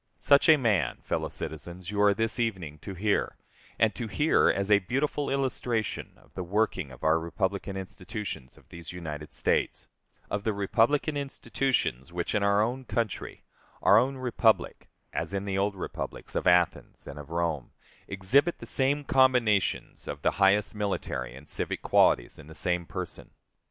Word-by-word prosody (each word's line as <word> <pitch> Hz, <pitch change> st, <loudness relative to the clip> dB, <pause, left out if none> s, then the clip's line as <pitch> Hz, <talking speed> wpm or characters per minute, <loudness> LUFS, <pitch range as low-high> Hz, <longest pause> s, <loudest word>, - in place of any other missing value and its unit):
Such 140 Hz, +2 st, +4 dB
a 155 Hz, -, +8 dB
man, 110 Hz, -9 st, +1 dB
fellow -, -, -2 dB
citizens, 85 Hz, +4 st, -7 dB
you 105 Hz, 0 st, 0 dB
are 100 Hz, -1 st, +5 dB
this 115 Hz, +3 st, 0 dB
evening 95 Hz, -10 st, -2 dB
to 95 Hz, +6 st, -7 dB
hear, 105 Hz, +3 st, 0 dB, 0.4 s
and 110 Hz, -1 st, +3 dB
to 120 Hz, -, -5 dB
hear 150 Hz, +9 st, +3 dB
as 100 Hz, +1 st, 0 dB
a 100 Hz, -, +7 dB
beautiful 135 Hz, +8 st, -1 dB
illustration 125 Hz, -5 st, -2 dB
of -, -, -24 dB
the 95 Hz, -, -5 dB
working 95 Hz, -4 st, 0 dB
of 65 Hz, -, -13 dB
our 80 Hz, +1 st, +4 dB
republican 95 Hz, +3 st, -2 dB
institutions 95 Hz, -, -7 dB
of -, -, -20 dB
these 85 Hz, -2 st, -9 dB
United 75 Hz, -4 st, -7 dB
States; -, -, -1 dB, 0.4 s
of 100 Hz, 0 st, -3 dB
the 110 Hz, -, 0 dB
republican 115 Hz, +9 st, +1 dB
institutions 135 Hz, -, -1 dB
which 85 Hz, 0 st, -3 dB
in 105 Hz, -, +1 dB
our 100 Hz, +1 st, +3 dB
own 125 Hz, +4 st, -2 dB
country, 115 Hz, -4 st, -3 dB, 0.4 s
our 100 Hz, -, +7 dB
own 135 Hz, +3 st, 0 dB
republic, 120 Hz, -3 st, +1 dB, 0.2 s
as 100 Hz, -, -3 dB
in 100 Hz, 0 st, -2 dB
the 95 Hz, -1 st, -1 dB
old 100 Hz, 0 st, 0 dB
republics 95 Hz, -, -6 dB
of -, -, -1 dB
Athens 90 Hz, -1 st, +2 dB
and -, -, -8 dB
of 75 Hz, 0 st, -10 dB
Rome, 85 Hz, -2 st, -1 dB, 0.4 s
exhibit 125 Hz, -, +2 dB
the -, -, -9 dB
same 140 Hz, +2 st, +1 dB
combinations 125 Hz, -8 st, +2 dB
of 70 Hz, 0 st, -6 dB
the -, -, +3 dB
highest 100 Hz, +2 st, +4 dB
military 95 Hz, -, -3 dB
and 70 Hz, +2 st, -13 dB
civic -, -, -3 dB
qualities -, -, +3 dB
in -, -, -12 dB
the 80 Hz, -, -11 dB
same 90 Hz, -1 st, -1 dB
person. 90 Hz, -3 st, -6 dB
100 Hz, 165 wpm, -28 LUFS, 90-120 Hz, 0.4 s, a